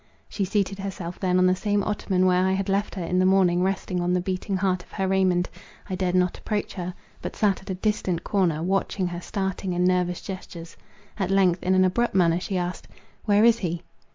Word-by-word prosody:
She 200 - -2
seated 195 0 -1
herself 185 -3 -5
then 180 -1 +1
on 185 - +4
the 185 0 +4
same 205 +1 0
ottoman 190 -3 0
where 180 0 +3
I 190 - +2
had 195 0 -1
left 200 +2 0
her 185 - -3
in 180 +2 0
the 185 - +3
morning 185 -2 +4
resting 185 -1 -1
on 175 +1 +1
the 180 - +2
beating 185 +2 -2
heart 185 -1 0
of - - -21
her 195 -2 -1
Raymond; 185 -2 +2 0.4
I - - -1
dared 185 -1 0
not 180 -1 +1
approach 210 -2 -3
her, 180 -1 -5 0.3
but - - -5
sat 205 -3 +1
at 190 - -14
a 190 - -1
distant 190 -3 -1
corner, 170 -6 +1
watching 190 +1 0
her 175 0 -5
starting 190 -1 -3
and 180 +1 +2
nervous 180 -1 +1
gestures. 175 -3 -8 0.4
At 190 -2 0
length, 190 -2 +3
in 185 +1 +2
an 185 0 +5
abrupt 235 +4 0
manner 170 -2 +4
she 190 +1 -3
asked, 180 0 -4 0.4
"Where 205 -1 +4
is 235 0 +5
he?" 170 -2 -3
185 Hz, 220 wpm, -25 LUFS, 180-195 Hz, 0.4 s, an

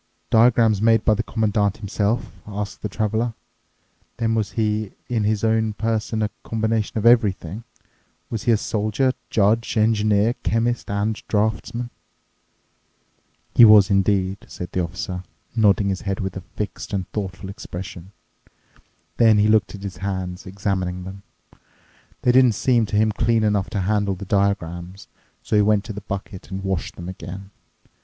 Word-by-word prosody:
"Diagrams 110 -2 +4
made 115 -1 +4
by 110 - +5
the 105 - 0
Commandant 105 -3 0
himself?" 105 +2 -1 0.2
asked 105 0 -5
the 105 - -3
Traveler. 110 +3 -1 0.8
"Then 115 -2 0
was 110 -2 -1
he 110 -2 -1 0.2
in 115 -4 0
his 105 0 0
own 110 -1 +2
person 110 0 -1
a 105 - -1
combination 110 -1 -1
of 110 - -1
everything? 110 -3 +3 0.7
Was 115 -2 -4
he 120 -2 +5
soldier, 110 +5 0 0.2
judge, 110 +3 +2
engineer, 110 0 +3
chemist, 115 +1 0
and 105 +2 -1
draftsman?" 110 +3 -1 1.6
"He - - +7
was 105 -3 +8
indeed," 95 -1 +2
said 90 - -7
the 90 - 0
Officer, 90 +1 -4 0.3
nodding 105 -3 +3
his 95 -1 -2
head 95 -1 -3
with 95 -2 -3
a 95 - -5
fixed 105 +3 -6
and 95 -2 -2
thoughtful 95 -2 -5
expression. 95 -1 -8 1.1
Then 110 -2 +5
he 105 +1 +4
looked 110 -1 +2
at 100 - -11
his 95 -2 -6
hands, 95 -2 -4
examining 95 -2 -2
them. 95 +1 -9 1.0
They 125 - +5
didn't 125 -2 +5
seem 115 0 +2
to 105 - -3
him 110 +1 +3
clean 115 +1 +1
enough 105 -1 +1
to 105 -3 -2
handle 100 0 0
the 100 - -8
diagrams. 95 -1 -1 0.4
So - - -1
he - - +6
went 105 -1 +3
to 110 0 -7
the 105 - -7
bucket 95 -2 -7
and 95 0 -5
washed 95 -2 -2
them 85 - -8
again. 95 +1 -8
105 Hz, 155 wpm, -22 LUFS, 95-110 Hz, 1.6 s, was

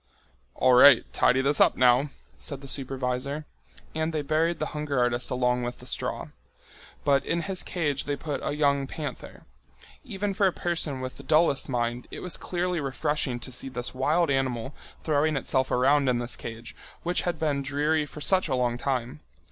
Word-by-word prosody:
"All 130 -1 +4
right, 140 +3 +8
tidy 130 - +3
this 140 +2 +2
up - - +5
now," 125 +3 +4 0.3
said 140 -2 -6
the 140 - -10
supervisor. 135 +2 -3 0.5
And 160 +1 -1
they 155 -2 -2
buried 160 +3 +1
the - - -2
hunger 150 -2 -2
artist 120 0 +1
along 125 -1 +1
with 120 0 -4
the - - -13
straw. - - -4 0.8
But 140 -1 +3
in 170 0 -1
his 190 +2 -2
cage 150 -6 -2
they 145 - -1
put 145 0 -4
a - - -2
young 140 -2 +2
panther. 150 +1 -7 0.6
Even 205 -5 -3
for 195 0 +3
a - - +2
person 160 -7 -3
with 130 0 -6
the 140 - -11
dullest 155 0 +2
mind 120 -1 -2
it - - -7
was 180 - -1
clearly 180 -1 -2
refreshing 140 -2 -1
to 130 - -5
see 130 +2 -4
this 125 -1 -4
wild 140 +5 +1
animal 130 -1 -1 0.3
throwing 155 0 +1
itself 130 -1 0
around 135 +2 +3
in 125 - +2
this 120 0 -3
cage, 115 0 -8 0.3
which 175 +1 +1
had 175 -2 -2
been 150 -3 0
dreary 150 +3 0
for 150 - -10
such 185 +3 +3
a 135 - 0
long 120 -1 0
time. 125 - -2
140 Hz, 185 wpm, -27 LUFS, 125-155 Hz, 0.8 s, right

